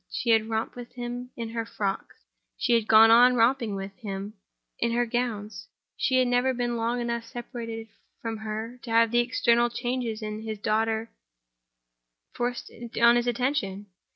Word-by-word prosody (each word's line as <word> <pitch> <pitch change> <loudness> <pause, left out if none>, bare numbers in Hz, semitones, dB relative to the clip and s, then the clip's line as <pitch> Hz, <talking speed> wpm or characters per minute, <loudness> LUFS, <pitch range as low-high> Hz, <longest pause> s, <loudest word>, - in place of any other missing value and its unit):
She 235 - -1
had 220 0 +3
romped 220 0 -2
with 245 -1 -9
him 245 0 -5
in 230 -1 -4
her 230 0 -3
frocks, 200 -3 -4 0.3
she 245 - +1
had 230 -2 +2
gone 225 +1 +8
on 245 +2 +7
romping 235 -2 +2
with 195 0 -6
him 200 -1 -6 0.5
in 235 0 0
her 240 +1 +2
gowns. 225 -3 -3 0.3
He 260 - +1
had 255 -1 +3
never 245 +1 +2
been 240 0 -1
long 235 +1 -1
enough 235 -1 -2
separated 230 -1 -7 0.3
from 225 -1 -4
her 220 +3 -5
to 245 - -10
have 230 0 +4
the 240 - +3
external 240 0 +3
changes 240 -2 -3
in 215 0 -4
his 220 -1 -5
daughter 220 +2 0 1.2
forced 245 0 -3 0.3
on 235 0 +7
his 240 0 +1
attention. 235 -6 -1
230 Hz, 165 wpm, -27 LUFS, 220-240 Hz, 1.2 s, gone